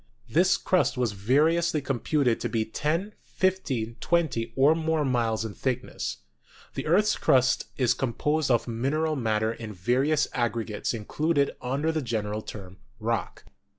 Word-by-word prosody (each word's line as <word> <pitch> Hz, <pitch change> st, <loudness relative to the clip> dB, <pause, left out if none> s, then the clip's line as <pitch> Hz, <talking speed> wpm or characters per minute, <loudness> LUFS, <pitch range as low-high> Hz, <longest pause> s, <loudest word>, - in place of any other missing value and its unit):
This 175 Hz, -, +3 dB
crust 185 Hz, -7 st, +1 dB
was 125 Hz, -4 st, +1 dB
variously 150 Hz, -, +2 dB
computed 135 Hz, -2 st, 0 dB
to -, -, -2 dB
be 110 Hz, -2 st, 0 dB
ten, 165 Hz, -, -2 dB
fifteen, 135 Hz, -12 st, -1 dB
twen 170 Hz, -2 st, +2 dB
ty, 115 Hz, -2 st, -4 dB
or 140 Hz, +3 st, +5 dB
more 160 Hz, -2 st, 0 dB
miles 115 Hz, -4 st, 0 dB
in 110 Hz, -, -5 dB
thickness. 125 Hz, +1 st, -3 dB, 0.5 s
The -, -, -4 dB
earth's 205 Hz, +6 st, +3 dB
crust 130 Hz, 0 st, +2 dB
is 125 Hz, -3 st, +3 dB
composed 150 Hz, +4 st, -1 dB
of 120 Hz, -1 st, +2 dB
mineral 145 Hz, +7 st, 0 dB
matter 110 Hz, -3 st, 0 dB
in 115 Hz, -2 st, -8 dB
various 130 Hz, -, +1 dB
aggregates 115 Hz, -2 st, -1 dB
included 140 Hz, +6 st, 0 dB
under 140 Hz, +6 st, 0 dB
the 160 Hz, -1 st, -1 dB
general 110 Hz, -4 st, -2 dB
term 95 Hz, -3 st, -9 dB, 0.2 s
Rock. 115 Hz, +1 st, -2 dB
130 Hz, 145 wpm, -27 LUFS, 115-155 Hz, 0.5 s, or